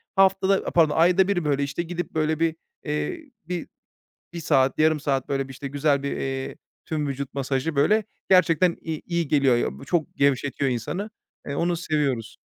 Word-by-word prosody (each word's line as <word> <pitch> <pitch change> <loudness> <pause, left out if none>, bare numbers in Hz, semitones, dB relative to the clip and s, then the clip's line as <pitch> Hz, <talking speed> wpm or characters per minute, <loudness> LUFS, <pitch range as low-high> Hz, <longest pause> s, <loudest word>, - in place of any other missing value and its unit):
haftada 195 0 +4
a - - -1
pardon 160 -3 +3
ayda 180 +3 +5
1 175 -5 0
böyle, 140 -1 +1
işte, 145 +5 -2
gidip, 175 0 -5
böyle, 155 0 0
bir, 165 -1 +1 0.3
eee, 290 - -3 0.2
bir 180 -2 -4 0.7
1 170 - -5
saat, 135 -4 +2
yarım 155 -1 +3
saat, 135 -3 -1
böyle, 135 -1 -1
bir, - - -8
işte, 140 +1 -6
güzel 140 0 +1
bir, 140 - -2
eee, 135 0 -4 0.3
tüm 150 -2 -2
vücut 140 0 -5
masajı, 140 +2 -2
böyle, 210 +9 +3 0.3
gerçekten, 180 -1 +4
i 160 -2 -5
iyi 170 -3 -1
geliyor 135 -4 +4
ya. 130 - -3
Çok 170 -1 -1
gevşetiyor 140 -1 +1
insanı. 180 - -3 0.4
Eee, 140 - -3
onu 170 +3 0
seviyoruz. 140 -9 -1
155 Hz, 175 wpm, -24 LUFS, 140-175 Hz, 0.7 s, ayda